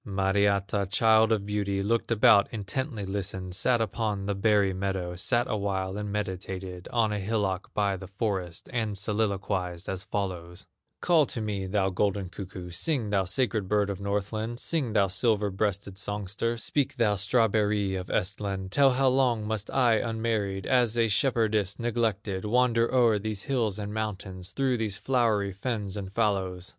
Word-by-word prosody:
Mariatta, 100 0 +1
child 110 +1 +4
of 105 -3 +1
beauty, 100 -1 -1
Looked 115 +3 0
about, 105 -2 +5
intently 110 +1 -3
listened, 95 -1 -4
Sat 120 +6 +2
upon 105 -2 -2
the 100 - 0
berry 100 -1 +2
meadow, 95 -2 -3
Sat 120 +6 +1
awhile, 95 -2 -2
and 105 0 -4
meditated 95 -2 -4
On 110 -3 +2
a 105 - -2
hillock 100 -2 -1
by 100 -2 +1
the 95 +1 -9
forest, 95 -4 -3
And 110 -4 -1
soliloquized 100 -4 -1
as 95 -1 -4
follows: 90 -3 -4 0.4
"Call 165 -5 +4
to - - -5
me, 100 -3 -3
thou 95 0 +1
golden 100 0 0
cuckoo, 90 -1 -8
Sing, 115 - 0
thou 95 -2 +2
sacred 110 0 0
bird 105 -1 +2
of 100 - -6
Northland, 105 +4 -2
Sing, 140 -9 -1
thou 100 -2 +4
silver 105 +1 +1
breasted 100 0 -2
songster, 105 +3 -2
Speak, 135 +4 -1
thou 115 -5 +2
strawberry 105 -1 +2
of 90 -1 -4
Ehstland, 95 -1 -2
Tell 135 +2 +5
how 135 +1 +2
long 125 -4 +2
must 105 -1 -3
I 120 -4 +3
unmarried, 110 -4 -1
As 120 -3 +2
a 115 -1 +3
shepherdess 110 -3 +1
neglected, 110 -5 -1
Wander 115 +1 +2
o'er 120 -5 +4
these 105 -1 -3
hills 115 -7 0
and 105 0 -5
mountains, 95 -4 -4
Through 130 +4 0
these 105 -3 -2
flowery 110 -4 +1
fens 100 -1 -3
and 95 -2 -5
fallows. 95 -4 -1
105 Hz, 160 wpm, -28 LUFS, 95-115 Hz, 0.4 s, about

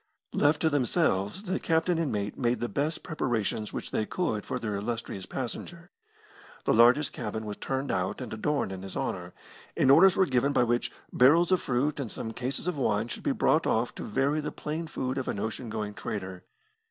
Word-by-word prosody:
Left 150 +1 +3
to 160 - +4
themselves, 130 - +1
the 185 -2 -1
captain 165 +1 +1
and 160 -5 0
mate 105 -1 -2
made 120 -1 0
the 120 - -1
best 145 +6 -2
preparations 115 - -1
which - - -5
they 110 - 0
could 115 - -2
for - - -2
their 105 -4 -3
illustrious 100 -2 -4
passenger. - - -5 0.7
The - - +3
largest 125 +6 +5
cabin 110 -2 -4
was 105 -1 -5
turned 135 +1 -2
out 95 +2 -1
and 125 -4 -6
adorned 140 -1 -1
in 95 -1 -6
his 95 0 -6
honour, 90 -1 -3 0.4
and 135 - +5
orders 180 +6 +7
were 190 - +5
given 135 -1 +1
by 125 - +4
which 120 0 0 0.2
barrels 165 +8 +5
of 185 - +4
fruit 140 +3 0
and 125 -7 -4
some 110 - -4
cases 130 +7 -3
of 175 -5 -1
wine 110 -2 +1
should - - -5
be 290 - 0
brought 165 - +2
off 115 +2 +1
to - - -7
vary 140 +7 +1
the 150 - -4
plain 160 +2 -4
food 130 -2 -2
of 130 - -4
an - - -2
ocean 110 +3 -4
going 105 -1 -3
trader. 95 -5 -5
125 Hz, 200 wpm, -28 LUFS, 105-150 Hz, 0.7 s, orders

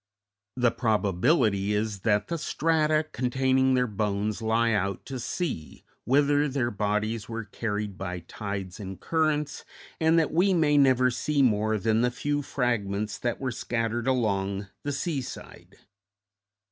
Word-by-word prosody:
The 125 -2 +3
probability 105 - +1
is 105 -1 -1
that 105 +1 +1
the 170 - -3
strata 155 0 +1
containing 130 +1 +2
their 125 0 +3
bones 105 0 -2
lie 115 +1 +2
out 100 -3 -1
to 130 -2 -5
sea, 120 - -4 0.2
whither 145 +2 +3
their 130 -3 -1
bodies 105 +2 -1
were 115 0 -4
carried 105 -2 -4
by 90 -2 -4
tides 100 +2 -6
and 95 -3 -7
currents, 155 - 0 0.4
and 160 +1 +4
that 160 -2 +2
we 185 +3 +3
may 150 -3 +3
never 130 -3 +4
see 145 +3 +1
more 110 -2 +2
than 110 +3 +1
the 125 - +3
few 145 +3 -2
fragments 105 -7 -1
that 120 -1 -2
were 130 -1 -2
scattered 115 0 -2
along 100 -5 0
the 145 - -3
seaside. 140 -2 -5
115 Hz, 140 wpm, -27 LUFS, 105-140 Hz, 0.4 s, and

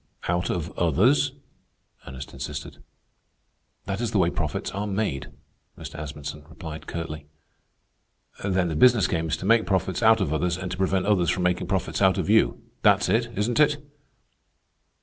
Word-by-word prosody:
"Out 90 +1 0
of 85 0 -2
others?" 120 - +3 0.7
Ernest 65 0 -8
insisted. - - -6 1.1
"That 100 +3 -3
is 120 - 0
the 110 - 0
way 90 -2 +3
profits 75 -4 -3
are 100 +2 -3
made," 95 -10 -2 0.5
Mr. - - -8
Asmunsen 75 0 -7
replied 80 -1 -8
curtly. 75 -3 -5 1.2
"Then 95 -2 +1
the 80 - -3
business 120 +8 +5
game 80 -1 -1
is 80 - -1
to - - -7
make 115 +2 +4
profits 95 -1 0
out 110 -1 +6
of 80 -7 0
others, 85 +3 0
and 90 -1 -5
to 90 - -4
prevent 95 0 +1
others 95 -5 +2
from 90 +1 0
making 90 0 0
profits - - -1
out - - +4
of - - 0
you. - - +3 0.2
That's - - +4
it, 115 +1 +2
isn't 115 +6 0
it?" 150 -1 +4
90 Hz, 165 wpm, -25 LUFS, 80-105 Hz, 1.2 s, out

